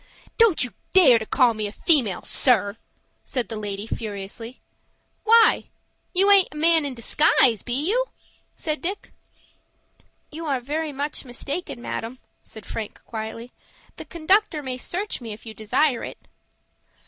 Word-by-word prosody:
"Don't 445 -10 +5
you 245 - -5 0.2
dare 275 -11 +7
to 220 - -7
call 250 -4 +3
me 215 -1 -3
a - - -7
female, 240 - +2
sir," 210 -5 +1 0.5
said 250 -6 -3
the 225 - -4
lady, 205 -1 -5
furiously. 220 +2 -6 0.7
"Why, 455 0 +5 0.4
you 390 +2 +3
aint 395 -2 +7
a - - -9
man 325 0 +4
in 275 -2 -3
disguise, 235 - +3
be 240 - -4
you?" - - +2 0.5
said 310 -2 -3
Dick. 385 +4 -4 1.2
"You 320 +1 -6
are 275 -3 0
very 300 +5 -3
much 285 +2 -4
mistaken, 255 +1 -5
madam," 230 +3 -5 0.2
said 220 -2 -13
Frank, 220 -2 -6
quietly. 225 +2 -7 0.5
"The - - -8
conductor 340 -1 +1
may 255 -1 -4
search 380 +3 -4
me, 225 -3 -6
if 215 - -14
you 220 - -8
desire 250 +5 0
it." - - -7
255 Hz, 150 wpm, -23 LUFS, 225-320 Hz, 1.2 s, dare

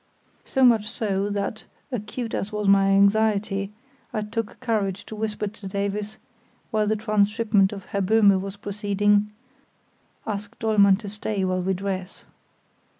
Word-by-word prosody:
So 265 - +1
much 225 -4 +5
so, 205 -3 -1
that, 205 +1 -3 0.3
acute 230 0 -4
as 195 - -2
was 210 -1 -2
my 195 0 +5
anxiety, 200 0 +2 0.4
I 220 -4 -2
took 225 0 -4
courage 205 -6 -1
to 220 - -8
whisper 215 -1 -2
to 210 -1 -7
Davies, 200 +2 -3 0.5
while 215 -2 +1
the 215 - +2
transhipment 210 -1 +2
of 195 -3 -8
Herr 200 - -2
Böhme 200 -1 +4
was 195 0 -6
proceeding: 205 0 +1 1.0
"Ask 205 -1 -5
Dollmann 205 -3 +4
to 210 - -7
stay 205 -1 -2
while 185 0 0
we 190 +1 0
dress." 190 0 -5
205 Hz, 145 wpm, -24 LUFS, 195-215 Hz, 1.0 s, much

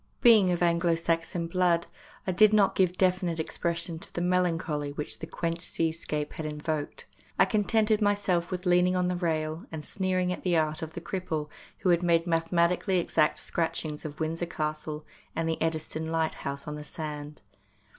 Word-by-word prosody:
Being 215 -7 +7
of 175 0 +1
Anglo 170 0 +3
Saxon 165 +1 -1
blood, 170 0 +2 0.4
I 185 - 0
did 215 +4 +5
not 205 -2 +5
give 185 -1 +2
definite 180 -3 +1
expression 170 +1 -2
to - - -5
the - - -4
melancholy 165 -5 0
which 150 0 -5
the 160 - -6
quenched 170 0 -3
seascape 160 -3 -2
had 160 - -5
invoked. 150 0 -4 0.3
I - - +6
con 210 -3 +1
tented 220 -1 +2
myself 200 -4 +1
with 185 0 -4
leaning 180 +1 +4
on 180 0 +1
the 180 - 0
rail, 160 -2 -2
and 155 -2 -5
sneering 185 -1 0
at - - -7
the 175 -2 +2
art 155 +1 0
of 160 -1 -5
the 170 - -6
cripple 160 -5 -3 0.3
who 185 - +2
had 170 -1 +4
made 170 -1 +3
mathematically 170 +2 +2
exact 160 -3 +2
scratchings 155 -2 -2
of 150 -1 -7
Windsor 165 +2 -2
Castle 155 -1 -4 0.3
and 165 0 -1
the 160 - -2
Eddystone 160 0 -2
Light 160 -1 0
house 140 +2 -5
on 150 - -3
the 150 0 -6
sand. 150 -3 -6
170 Hz, 180 wpm, -28 LUFS, 155-180 Hz, 0.4 s, Being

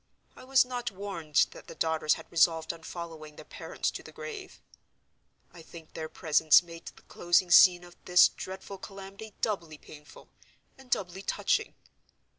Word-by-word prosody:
I - - -13
was 260 0 +4
not 245 -1 -4
warned 185 -6 0
that - - -14
the - - -10
daughters 160 -1 +1
had 160 - -11
resolved 165 -1 +2
on 165 - -14
following 160 -3 -9
their 155 - -12
parents - - -4
to - - -7
the - - -13
grave. 450 -5 -9 0.9
I 170 - -12
think 160 0 -14
their 160 -1 -6
presence 155 0 +4
made 165 -1 -12
the - - -12
closing 175 +1 +1
scene 175 0 +7
of 175 0 -15
this 180 0 +7
dreadful 190 +1 -9
calamity 195 +2 -10
doubly 170 -8 -3
painful, 150 0 -15 0.5
and 265 -1 -18
doubly 190 -4 -2
touching. - - -1
175 Hz, 160 wpm, -29 LUFS, 160-200 Hz, 0.9 s, scene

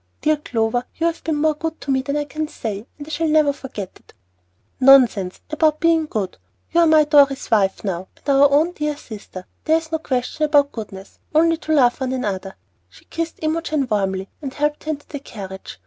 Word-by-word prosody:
Dear 305 0 +2
Clover, 240 -3 -1
you 330 - -1
have 335 0 -1
been 315 -1 -1
more 310 +1 +2
good 320 +1 -5
to 280 - -3
me 265 0 +2
than 280 +2 -2
I 295 - 0
can 305 +2 -4
say, 215 -5 -6
and 290 - -8
I 315 - -10
shall 325 +2 0
never 305 -2 +3
forget 215 -9 -7
it." - - -24 0.6
"Nonsense 250 -9 +5
about 310 0 +2
being 330 -2 +3
good! 205 -9 -4 0.3
You 340 - +3
are 335 - +5
my 315 -1 +6
Dorry's 285 -3 +3
wife 195 -3 +2
now, 190 -2 -3
and - - -22
our 280 0 +5
own 305 +5 +3
dear 300 -4 -3
sister. 205 -8 -10 0.2
There 320 +1 +4
is 325 0 -7
no 320 - 0
question 260 +1 -1
about 290 -2 +3
goodness, 200 -3 -9 0.2
only 330 +1 +4
to 315 -1 -2
love 250 -1 +3
one 260 0 -1
another." 195 -6 -3 0.3
She - - -20
kissed 330 -1 -5
Imogen 310 -3 -1
warmly, 190 -2 0
and 275 -3 -5
helped 295 0 -1
her - - -4
into 290 -2 -3
the 290 - -6
carriage. 190 - -9
285 Hz, 210 wpm, -21 LUFS, 225-310 Hz, 0.6 s, my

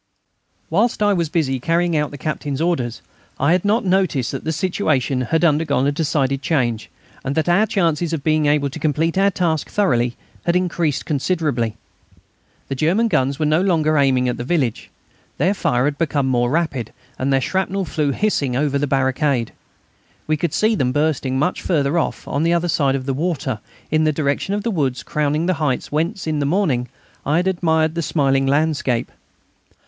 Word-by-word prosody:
Whilst 210 +5 +2
I 205 0 +4
was 170 -4 0
busy 145 -6 0
carrying 170 +4 +1
out 150 -1 +1
the 145 - -9
Captain's 145 -1 -3
orders 135 -9 -1 0.4
I 140 +4 +3
had 180 0 +2
not 210 +3 +1
noticed 185 -9 +1
that 135 - -5
the 160 - -1
situation 155 -7 0
had 160 +7 +1
undergone 150 -4 +2
a 140 - +2
decided 140 -3 0
change, 120 -7 -1 0.3
and 135 +1 -2
that 160 - 0
our 190 +5 +3
chances 170 -4 0
of 160 -4 -3
being 155 -1 +2
able 145 -1 +2
to 160 - -7
complete 155 +2 0
our 195 +1 +4
task 170 -5 -1
thoroughly 120 -12 +1 0.3
had 170 0 +1
increased 175 -5 0
considerably. 140 -7 -1 0.9
The - - -3
German 180 - +1
guns 135 -5 +1
were 155 - 0
no 155 +3 +3
longer 160 -5 +2
aiming 135 -3 +3
at 125 - -1
the 120 - -4
village. 135 -5 -1 0.5
Their 180 +8 +2
fire 125 -10 +1
had 145 0 -1
become 145 -4 0
more 120 -2 +1
rapid, 145 -7 -1 0.3
and 135 +2 0
their 135 - +3
shrapnel 190 +5 -1
flew 150 -3 -1
hissing 140 -6 0
over 140 +1 +1
the 145 - 0
brigade. 130 -2 +1 0.7
We 155 - +1
could 160 +1 -2
see 215 +1 +3
them 130 - +1
bursting 140 -2 0
much 150 +7 0
further 155 -1 +1
off, - - -3
on 140 - -1
the 165 +1 +2
other 170 0 0
side 140 -4 +2
of 130 -1 -4
the 135 - -1
water, 145 -6 -2 0.3
in 155 0 +3
the 155 - +3
direction 150 +6 -1
of 205 - -3
the 230 - -1
woods 130 - -1
crowning 150 +3 0
the 185 - +2
heights 135 -5 -1
whence, 170 +7 -1
in 155 -2 -1
the 140 - 0
morning, 145 - 0 0.3
I 145 - 0
had 180 - +1
admired 160 -4 +1
the 170 - -2
smiling 135 -4 +1
landscape. 140 -4 0
150 Hz, 190 wpm, -20 LUFS, 135-170 Hz, 0.9 s, I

